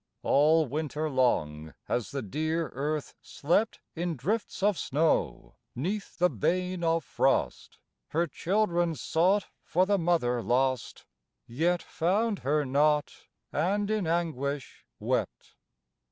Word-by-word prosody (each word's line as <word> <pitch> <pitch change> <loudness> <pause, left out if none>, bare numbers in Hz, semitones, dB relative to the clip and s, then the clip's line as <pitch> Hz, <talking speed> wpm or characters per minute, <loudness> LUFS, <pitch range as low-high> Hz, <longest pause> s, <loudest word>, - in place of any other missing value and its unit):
All 155 +3 +4
winter 150 +2 -3
long 80 - 0
has 120 -2 -2
the 140 -2 -4
dear 155 - -2
Earth 145 +4 -3
slept 175 +9 0 0.2
In 170 0 -2
drifts 195 - -2
of 205 0 +4
snow, 150 - 0 0.2
'neath 190 - -3
the 180 - +4
bane 180 - -1
of 165 -1 +2
frost, - - 0 0.3
Her 170 +3 +1
children 175 0 0
sought 185 +7 +2 0.2
for 180 +3 +2
the 200 0 +2
Mother 160 -9 +1
lost, 130 +2 0 0.4
Yet 165 +8 0
found 200 +5 0
her 145 +2 +1
not, 145 +2 +2 0.4
and 205 +4 0
in 210 -5 0
anguish 145 - -2
wept. - - -2
160 Hz, 120 wpm, -28 LUFS, 135-180 Hz, 0.4 s, All